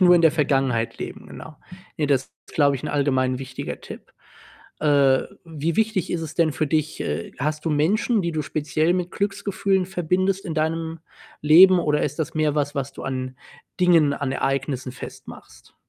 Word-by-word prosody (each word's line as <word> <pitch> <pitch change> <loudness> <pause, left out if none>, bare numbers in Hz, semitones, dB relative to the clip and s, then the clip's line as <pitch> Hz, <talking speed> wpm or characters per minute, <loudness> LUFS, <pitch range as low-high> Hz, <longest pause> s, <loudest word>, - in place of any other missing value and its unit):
nur 180 -1 +7
in 170 - +4
der 160 -2 +5
Vergangenheit 135 -6 0
leben, - - -7
genau. 155 -2 -11 0.4
Ne, 150 -3 0
das 135 -2 +2 0.2
ist, - - -16
glaube 140 -2 +3
ich, 125 - -10
'n - - -4
allgemein 130 -3 +1
wichtiger 130 -1 -6
Tipp. - - -11 0.7
Äh, 140 -3 +4 0.2
wie 160 0 -3
wichtig 220 -5 0
ist 170 - -1
es 155 -1 -6
denn 165 -3 +2
für 155 - -1
dich? 155 +1 -1
Äh, 75 +3 -3
hast 150 +2 -2
du 165 - 0
Menschen, 205 +9 +1
die 170 - -1
du 155 -1 -1
speziell 155 +3 0
mit 180 -1 -2
Glücksgefühlen 200 -1 -1
verbindest 185 +2 0
in 165 - -4
deinem 160 +1 -2 0.4
Leben 180 +5 +8
oder 150 -2 +1
ist 150 +2 -2
das 160 +1 -3
mehr 155 -2 +1
was, 145 -1 -1
was 140 0 -3
du - - -9
an 130 -1 -4 0.4
Dingen, 165 -5 +5
an 140 -1 -3
Ereignissen 135 -1 -2
festmachst? - - -12
155 Hz, 180 wpm, -23 LUFS, 140-175 Hz, 0.7 s, Leben